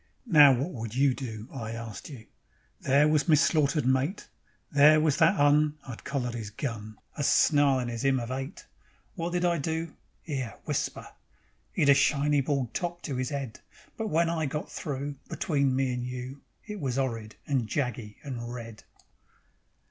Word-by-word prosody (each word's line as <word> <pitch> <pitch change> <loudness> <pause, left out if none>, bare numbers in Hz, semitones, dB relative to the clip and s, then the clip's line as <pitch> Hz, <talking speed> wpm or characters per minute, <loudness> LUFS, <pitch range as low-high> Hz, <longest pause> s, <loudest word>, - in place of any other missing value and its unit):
Now 150 - +8
what 135 +7 0
would 115 -2 -6
you 135 0 +4
do? 110 -4 -6
I 115 -4 -5
arst 115 0 -7
you. 125 -7 -10 0.5
There 140 +3 +4
was 155 +2 +2
me 155 - +7
slaughtered 150 -1 +2
mate. 130 +9 0 0.4
There 150 +2 +7
was 155 -2 +2
that 170 +3 +4
'Un 150 +1 +4
(I'd 120 -4 -8
collered 130 -4 -2
'is 115 -3 -5
gun), 110 -2 -5 0.2
A - - +1
snarlin' 140 -4 +4
'is 115 -1 -4
'ymn 135 -1 +3
of 120 +1 -5
'ate. 135 +5 -5 0.5
Wot 170 -2 -3
did 175 0 0
I 170 -2 +2
do? 160 +2 -3 0.3
'Ere, 135 -7 -3
whisper... - - -2 0.7
'E'd 145 - +3
a - - +9
shiny 145 +1 +3
bald 135 -4 -1
top 175 -1 -3
to 135 -4 -3
'is 130 +3 -2
'ead, 135 -5 -4 0.4
But 220 - -3
when 170 -3 +2
I 165 -2 -1
got 150 +3 -4
through, 145 -2 -4
Between 140 -5 0
me 130 -1 +1
and 125 0 -3
you, 125 +2 -6 0.2
It 210 -1 -6
was 135 -3 -2
'orrid 115 -5 -2
and 130 -6 0
jaggy 120 -5 -3
and 120 -4 -5
red. 115 -3 -8
140 Hz, 170 wpm, -28 LUFS, 125-150 Hz, 0.7 s, a